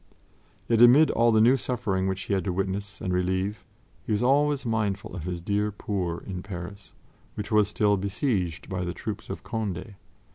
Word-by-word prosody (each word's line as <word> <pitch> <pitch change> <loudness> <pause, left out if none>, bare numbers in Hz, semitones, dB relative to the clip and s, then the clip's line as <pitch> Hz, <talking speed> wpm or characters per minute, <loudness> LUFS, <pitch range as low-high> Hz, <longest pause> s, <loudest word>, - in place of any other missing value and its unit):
Yet, 115 -1 +3
amid 130 +6 +7
all 120 +1 +3
the 110 - +4
new 120 +4 +6
suffering 110 -8 -1
which 95 0 -2
he 100 - -2
had 95 - +1
to 95 - 0
witness 95 +2 -3
and 95 -4 -1
relieve, 95 +3 -1 0.4
he - - -5
was 105 +2 +1
always 140 +1 +2
mindful 105 -4 -1
of 85 -4 -6
his 90 -1 -4
dear 105 +2 0
poor 95 -4 -3
in 90 -2 -5
Paris, 95 0 -8 0.4
which 105 +1 -5
was 105 -2 +4
still 105 0 +2
besieged 95 - -1
by 90 -2 -3
the 90 0 -4
troops 110 -3 -6
of - - -6
Condé. 110 -1 -4
100 Hz, 185 wpm, -26 LUFS, 95-110 Hz, 0.4 s, amid